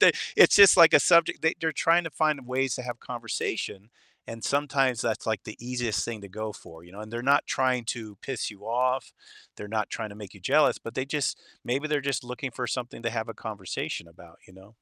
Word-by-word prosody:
They - - +8 0.2
it's, - - +7
just, 200 -2 +9
like, 165 -2 +8
a - - +8
subject, 170 0 +4
they 160 - +2
they're 160 -1 0
trying 165 +4 +3
to 165 - -5
find 150 -4 0
ways 130 0 0
to 125 - -5
have 120 -1 -6
conversation 115 -3 -4 0.4
and 115 0 -8
sometimes 135 -4 +1
that's, 115 0 -2
like, 110 -3 -1
the 110 - -8
easiest 120 -3 -2
thing 115 -3 -5
to 100 - -10
go 110 +2 -5
for, 80 -3 -14
you 90 - -17
know, 100 - -10
and 110 +1 -9
they're 120 - -4
not 140 +3 +3
trying 130 -2 0
to 110 -3 -5
piss 130 -6 -3
you 100 -1 -15
off, 125 +3 0 0.4
they're 105 - -8
not 110 -1 -2
trying 110 -1 -5
to - - -10
make 105 -1 -11
you 100 - -14
jealous, 145 +9 +3
but 115 - -9
they 130 - -1
just 145 -2 -1 0.3
maybe 140 +5 -1
they're 150 -1 +1
just 140 -2 -2
looking 125 +2 -5
for 125 +1 -4
something 120 +1 -5
to 115 - -1
have 110 -1 -3
a 115 - -6
conversation 100 -5 -5
about, 85 0 -17
you - - -18
know? 95 +4 -17
120 Hz, 235 wpm, -27 LUFS, 110-135 Hz, 0.4 s, just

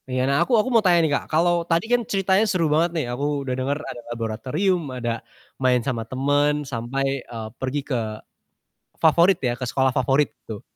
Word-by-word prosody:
Iya, 130 0 0
nah, 140 +1 +2
aku - - 0
aku 215 +4 +2
mau 230 - +5
tanya 175 -2 +5
nih 155 - 0
Kak - - -1
kalau 170 +2 +2
tadi 170 +4 +2
kan 245 - +4
ceritanya 195 +1 +2
seru 180 -3 +1
banget 165 +3 +3
nih 155 - 0
aku 140 +2 -2
udah 130 - -2
denger 140 +2 -1
ada 120 - -7
laboratorium 125 - -1 0.2
ada 120 -1 -3 0.5
main 125 -1 +3
sama 120 -4 -1
temen 145 +3 +2 0.2
sampai, 120 +4 -2 0.2
eee, 115 -3 -7
pergi 130 +2 -1
ke 130 - 0 1.0
favorit 170 +4 +5
ya 120 -2 -1
ke 125 - -4
sekolah 130 +2 +1
favorit 135 +3 +2 0.2
gitu 110 -3 -7
140 Hz, 190 wpm, -23 LUFS, 125-170 Hz, 1.0 s, mau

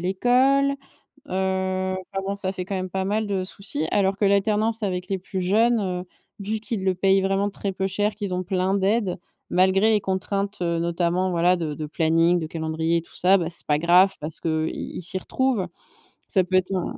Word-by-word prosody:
l'école, 255 +9 +3 0.6
heu, 190 0 -1
enfin 195 +1 -5
bon 200 - -1
ça 190 -2 -2
fait 185 -1 -5
quand 195 - -4
même 185 -1 -4
pas 190 0 -1
mal 210 +3 0
de 195 -2 -1
soucis. 180 -5 -3
Alors 195 -1 +2
que 205 - +3
l'alternance 215 +3 +1
avec 185 -1 -2
les 195 - 0
plus 185 0 -5
jeunes, 225 +5 +3
heu, 180 -2 -2 0.4
vu 215 +2 -2
qu'ils 215 -3 -4
le 190 -1 +2
payent 195 +1 +3
vraiment 195 +1 +1
très 200 0 -4
peu 190 +1 -2
cher 205 +3 0
qu'ils 205 -2 -5
ont 185 - -2
plein 185 +1 0
d'aide, 200 -1 +1 0.3
malgré 190 +4 +4
les 215 -2 +3
contraintes, 195 +1 -2
heu, 170 -1 0
notamment 170 +2 0
voilà 175 +1 +3
de 160 -4 -3
de 155 0 -5
planning, 165 +2 +2
de 160 - -3
calendrier 160 +1 -1
et - - -1
tout 170 - -17
ça, 190 +2 +4
bah 170 -1 -2
c'est 170 - -3
pas 150 0 +2
grave 180 +3 +5
parce 155 +1 -5
que, 160 -1 -1
heu, - - -1
i - - -6
ils - - -5
s'y 180 +2 -3
retrouvent. 250 0 0 0.6
Ça 190 - +3
peut 185 +1 -2
être 185 +1 0
un 180 - -3
190 Hz, 215 wpm, -24 LUFS, 180-200 Hz, 0.6 s, grave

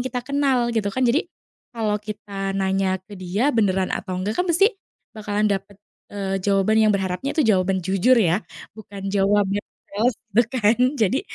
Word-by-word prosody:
kita 250 -1 -3
kenal 270 -3 +1
gitu 215 -3 0
kan, 260 - -3
jadi 250 +7 +2 0.5
kalau 215 -3 -1
kita 205 -2 -5
nanya 190 -1 0
ke 195 +2 -13
dia 190 +9 -1
beneran 195 -7 +1
atau 185 - -4
enggak 210 +4 -2
kan 360 - +1
pasti 390 +6 +3 0.4
bakalan 210 0 0
dapet, 200 0 -4 0.3
eee, 195 -1 -2
jawaban 195 +2 +1
yang 215 -1 +4
berharapnya 190 +7 -2
itu 315 - 0
jawaban 190 -1 +2
jujur 195 +7 +2
ya 180 +2 +1 0.3
bukan 200 -2 -8
jawaban 200 0 +2 0.8
itu 235 +4 +5
kan 225 -3 +3 0.2
jadi, 220 +6 +2
205 Hz, 160 wpm, -22 LUFS, 195-225 Hz, 0.8 s, itu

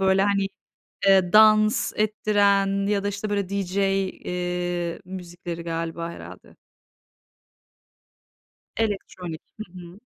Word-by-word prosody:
böyle, 190 0 +3
hani, 200 -1 +1 0.6
eee, 190 -1 +5
dans 215 0 +5
ettiren 200 -2 +2
ya 205 -1 +1
da, - - 0
işte, 205 +1 -3
böyle 200 -2 -1
DJ, 200 -1 -3
eee, 180 -3 -2
müzikleri 175 -2 -7
galiba 165 0 -3
herhâlde. - - -12 2.2
Elektronik. 185 -6 -3 0.2
Hı 215 - -5
hı. 180 +1 -11
195 Hz, 100 wpm, -24 LUFS, 175-205 Hz, 2.2 s, eee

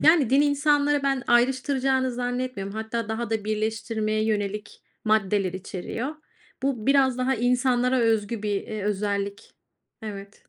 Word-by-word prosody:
Yani, 310 -6 +5
din 270 +2 +5
insanları 290 0 +2
ben 270 -2 +1
ayrıştıracağını 260 +1 +2
zannetmiyorum. 245 -5 -3
Hatta 220 0 -3
daha 225 +1 -3
da 220 -2 -1
birleştirmeye 215 0 -1
yönelik 210 -1 -2 0.2
maddeler 205 -3 +2
içeriyor. 195 - -5 0.5
Bu 265 -5 -1
biraz 270 -2 +4
daha 260 +1 +1
insanlara 250 +1 +2
özgü 225 -1 +1
bir, 210 - -1
eee, 215 -2 -5
özellik. 200 -1 -2 0.5
Evet. 200 -2 -9
230 Hz, 125 wpm, -25 LUFS, 210-260 Hz, 0.5 s, Yani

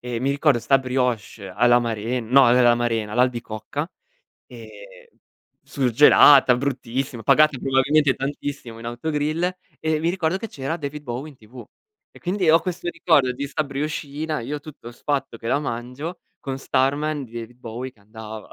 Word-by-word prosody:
E 120 -1 -4
mi 135 +2 +1
ricordo 140 -2 +2
sta 115 +4 +3
brioche 125 -6 -2
all'amaren 120 +2 +1
no, 135 0 +6
uhm, 125 +1 +5
l'amarena, 120 -3 +1
l'albicocca, 125 - -2 0.6
ehm, - - -12 1.0
surgelata, 130 0 +6
bruttissima, 130 -2 -3
pagata 155 +4 +4
probabilmente 135 +2 +2
tantissimo 135 -4 -5
in 115 - -11
autogrill 155 +8 -2 0.3
e 155 -1 0
mi 165 +2 +1
ricordo 175 -1 -1
che 225 +2 -6
c'era 140 +2 -4
David 150 -1 -6
Bowie 130 +4 -5
in 140 - -18
TV. 120 +1 -13 0.5
E - - -16
quindi 180 -2 +1
ho 165 - +7
questo 175 +1 -4
ricordo 145 -9 +2
di 140 +3 -4
sta 150 +2 -1
brioscina, 150 +1 -4
io 145 +6 -4
tutto 145 -6 -11
sfatto 135 -3 -3
che 115 - -9
la - - +2
mangio, 130 +6 -5 0.2
con 135 -1 -5
Starman 145 +3 0
di 115 - -16
David 120 +1 -8
Bowie 125 +2 -7
che 110 - -29
andava. 110 +1 -10
135 Hz, 155 wpm, -22 LUFS, 120-150 Hz, 1.0 s, ho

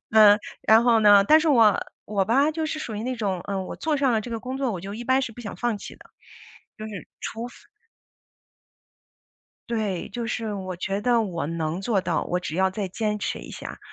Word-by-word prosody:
嗯， 210 -2 +7 0.2
然 220 +1 +6
后 235 -2 +4
呢， 205 -2 +7
但 310 +8 +6
是 315 - +1
我 225 -7 +5 0.3
我 200 -2 0
吧 275 +8 +3
就 315 0 -2
是 310 0 -3
属 220 -7 -5
于 - - -4
那 255 +1 -2
种， 200 -6 -2
嗯， 195 -2 -2
我 - - -7
做 310 -2 0
上 270 -3 +2
了 220 - +2
这 240 - -8
个 225 - -3
工 255 +2 -5
作， 260 -5 0
我 180 - -5
就 200 +2 -7
一 240 - -6
般 260 +2 +2
是 240 - -3
不 240 - -11
想 215 -4 -6
放 240 -3 -1
弃 - - -9
的， - - -18 0.7
就 215 - -6
是 200 -5 -8
除 230 +2 -5
非 - - -14 2.2
对， 215 -6 -2
就 235 +3 -4
是 225 -2 -3
我 185 -2 -5
觉 195 +3 -2
得 235 +1 +3
我 170 -7 -3
能 165 +2 -3
做 200 -1 +1
到， - - -1
我 180 - -1
只 165 -2 -5
要 190 0 +3
再 195 0 -3
坚 210 +2 -2
持 - - -3
一 - - -10
下， - - -8
215 Hz, 240 characters per minute, -25 LUFS, 195-240 Hz, 2.2 s, 嗯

